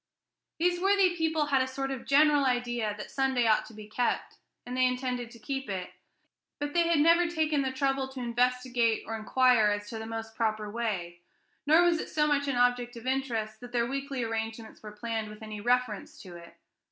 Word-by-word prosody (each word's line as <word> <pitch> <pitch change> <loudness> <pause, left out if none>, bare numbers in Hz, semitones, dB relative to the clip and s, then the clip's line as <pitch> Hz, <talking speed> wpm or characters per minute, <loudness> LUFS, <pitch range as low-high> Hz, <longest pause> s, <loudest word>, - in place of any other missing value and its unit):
These 350 +1 +1
worthy 390 -2 +3
people 320 -2 +1
had 275 -2 +2
a 260 - 0
sort 270 +1 -3
of 265 -3 -6
general 295 0 +5
idea 240 -4 0
that 210 - -8
Sunday 265 -3 +1
ought 215 -1 +3
to 225 - -13
be 210 -1 -10
kept, 240 +3 -2 0.3
and 245 +1 -5
they 255 0 +4
intended 250 -1 -2
to 235 - -14
keep 270 +2 -5
it; 185 -2 -4 0.7
but 290 0 -4
they 340 -1 +3
had 335 -1 +3
never 335 +3 +5
taken 315 -3 0
the 265 -1 -1
trouble 270 0 0
to 265 0 -9
investigate 245 -1 +1
or 225 - -4
inquire 245 0 +3
as 205 0 -1
to 225 - -5
the 220 - -6
most 225 0 -6
proper 215 -2 -1
way, 195 -7 -3 0.5
nor 320 +3 +6
was 345 -2 +3
it - - -5
so 300 -1 +1
much 285 -1 +1
an 275 - 0
object 245 0 +1
of 230 - -10
interest 235 -5 -2
that 245 +1 -11
their 235 -1 +2
weekly 275 0 -3
arrangements 225 0 -5
were 210 - -9
planned 220 0 -4
with 210 +1 -11
any 215 -1 -7
reference 245 -3 0
to 180 -2 -11
it. 170 0 -13
245 Hz, 205 wpm, -29 LUFS, 220-275 Hz, 0.7 s, nor